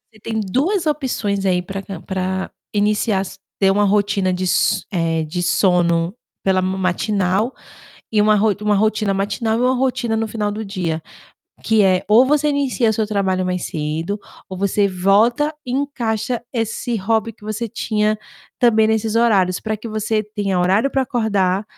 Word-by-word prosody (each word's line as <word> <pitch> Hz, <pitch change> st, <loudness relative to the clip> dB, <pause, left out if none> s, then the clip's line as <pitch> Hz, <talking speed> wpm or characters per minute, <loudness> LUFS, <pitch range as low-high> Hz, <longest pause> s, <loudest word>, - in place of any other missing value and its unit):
você 215 Hz, -, -17 dB
tem 220 Hz, +1 st, -3 dB
2 315 Hz, -, 0 dB
opções 235 Hz, -10 st, -1 dB
aí, 180 Hz, -2 st, +2 dB
pra 195 Hz, +2 st, -6 dB
cam 195 Hz, -4 st, -8 dB
pra 190 Hz, 0 st, -3 dB, 0.2 s
iniciar, 205 Hz, -2 st, 0 dB, 0.2 s
ter 195 Hz, -1 st, +4 dB
uma 205 Hz, +1 st, +3 dB
rotina 200 Hz, -2 st, +1 dB
de 185 Hz, +1 st, -2 dB
so 180 Hz, -, +2 dB
eh, 165 Hz, -3 st, 0 dB
de 165 Hz, +3 st, -4 dB
sono 175 Hz, -1 st, +2 dB, 0.3 s
pela 190 Hz, -1 st, +2 dB
ma 185 Hz, +1 st, -1 dB
matinal, 190 Hz, +4 st, 0 dB, 0.6 s
e 215 Hz, -, +2 dB
uma 215 Hz, 0 st, +4 dB
ro 210 Hz, 0 st, +2 dB
uma 210 Hz, 0 st, +2 dB
rotina 215 Hz, 0 st, +1 dB
matinal 205 Hz, +3 st, -1 dB
e -, -, 0 dB
uma 250 Hz, +1 st, +3 dB
rotina 250 Hz, -3 st, 0 dB
no 225 Hz, -, -1 dB
final 210 Hz, -1 st, -2 dB
do 215 Hz, +1 st, -5 dB
dia, 175 Hz, -5 st, -3 dB, 0.6 s
que 220 Hz, -1 st, +4 dB
é: 185 Hz, -1 st, +3 dB
ou 225 Hz, +6 st, +6 dB
você 300 Hz, +1 st, +2 dB
inicia 270 Hz, -5 st, +1 dB
o -, -, +1 dB
seu 220 Hz, 0 st, 0 dB
trabalho 190 Hz, -3 st, 0 dB
mais 180 Hz, -1 st, -2 dB
cedo, 160 Hz, +6 st, -3 dB, 0.3 s
ou 190 Hz, -, -5 dB
você 200 Hz, +1 st, +1 dB
volta 215 Hz, -, +2 dB
e 250 Hz, -, -5 dB
encaixa 240 Hz, -4 st, -2 dB
esse 230 Hz, 0 st, -2 dB
hobby 225 Hz, +3 st, 0 dB
que 210 Hz, -, -30 dB
você 215 Hz, +2 st, -3 dB
tinha 215 Hz, 0 st, 0 dB, 0.4 s
também 220 Hz, -3 st, +4 dB
nesses 220 Hz, 0 st, 0 dB
horários 195 Hz, -6 st, +3 dB
pra 215 Hz, -1 st, -2 dB
que 230 Hz, -, -7 dB
você 215 Hz, 0 st, -1 dB
tenha 205 Hz, -3 st, -2 dB
horário 195 Hz, +9 st, +2 dB
pra 270 Hz, -, +1 dB
acordar 205 Hz, -6 st, 0 dB
210 Hz, 175 wpm, -19 LUFS, 190-225 Hz, 0.6 s, ou